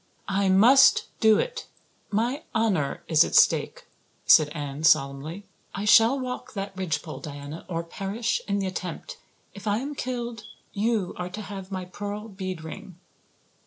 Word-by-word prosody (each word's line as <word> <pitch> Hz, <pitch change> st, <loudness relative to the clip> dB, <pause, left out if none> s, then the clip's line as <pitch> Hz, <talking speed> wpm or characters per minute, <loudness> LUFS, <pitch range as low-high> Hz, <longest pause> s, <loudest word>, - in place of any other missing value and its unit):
"I 195 Hz, 0 st, +2 dB
must 235 Hz, +9 st, +6 dB
do 220 Hz, -2 st, +5 dB
it. -, -, -3 dB, 0.4 s
My 240 Hz, +8 st, -1 dB
honor 195 Hz, -11 st, 0 dB
is 160 Hz, -3 st, +5 dB
at -, -, -3 dB
stake," -, -, +3 dB, 0.4 s
said 150 Hz, -1 st, +6 dB
Anne 145 Hz, -1 st, -6 dB
solemnly. 150 Hz, +6 st, +1 dB, 0.3 s
"I 200 Hz, -, -3 dB
shall 225 Hz, +5 st, +6 dB
walk 255 Hz, 0 st, -6 dB
that 195 Hz, -1 st, -5 dB
ridgepole, 165 Hz, -4 st, -3 dB
Diana, 145 Hz, +1 st, -8 dB
or 165 Hz, -1 st, -2 dB
perish 200 Hz, +7 st, -3 dB
in 200 Hz, 0 st, 0 dB
the 195 Hz, -, -1 dB
attempt. 185 Hz, -, -6 dB, 0.3 s
If 200 Hz, +2 st, -10 dB
I 205 Hz, 0 st, +2 dB
am 280 Hz, +5 st, -4 dB
killed 240 Hz, -4 st, -4 dB, 0.3 s
you 215 Hz, -3 st, 0 dB
are 180 Hz, 0 st, -4 dB
to 210 Hz, +4 st, -7 dB
have 195 Hz, -1 st, -8 dB
my 185 Hz, -1 st, -4 dB
pearl 205 Hz, +4 st, -6 dB
bead 185 Hz, -4 st, -6 dB
ring." 185 Hz, +3 st, -9 dB
195 Hz, 155 wpm, -26 LUFS, 170-225 Hz, 0.4 s, must